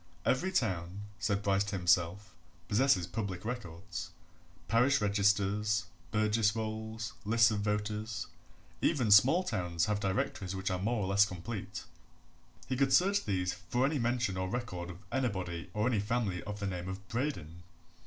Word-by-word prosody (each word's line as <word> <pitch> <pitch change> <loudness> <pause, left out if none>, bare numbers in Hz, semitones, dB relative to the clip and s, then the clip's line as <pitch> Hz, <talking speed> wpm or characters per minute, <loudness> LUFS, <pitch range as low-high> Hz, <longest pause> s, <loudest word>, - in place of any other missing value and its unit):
Every 180 +9 +2
town, 95 - -1 0.2
said 100 -1 0
Bryce 100 -1 +3
to 100 -1 -3
himself, 90 +2 +1 0.3
possesses 105 -5 +3
public 95 +1 -4
records 90 -6 -5 0.6
parish 125 +5 +4
registers, 105 +1 +2 0.2
burgess 110 0 +2
rolls, 110 0 -4
lists 115 +2 +4
of 105 - -1
voters; 105 +1 -2 0.6
even 125 -10 +2
small 135 - +7
towns 90 - -1
have 105 -1 0
directories 100 -1 -1
which 95 0 -2
are 90 - -1
more 110 +2 0
or - - -1
less 100 +1 +5
complete 95 +3 -6 0.8
he 130 - -1
could 135 0 +2
search 200 +3 +4
these 90 -3 0
for 95 +8 -1
any 145 +1 0
mention 120 -4 0
or 95 0 -2
record 95 -7 -4
of 90 +3 -10
anybody 95 -10 -2
or 105 +1 0
any 120 -4 +2
family 105 -4 -1
of 105 0 -5
the 100 - -3
name 90 -2 -3
of 95 +1 -7
Braden. 90 - -3
105 Hz, 155 wpm, -32 LUFS, 95-115 Hz, 0.8 s, small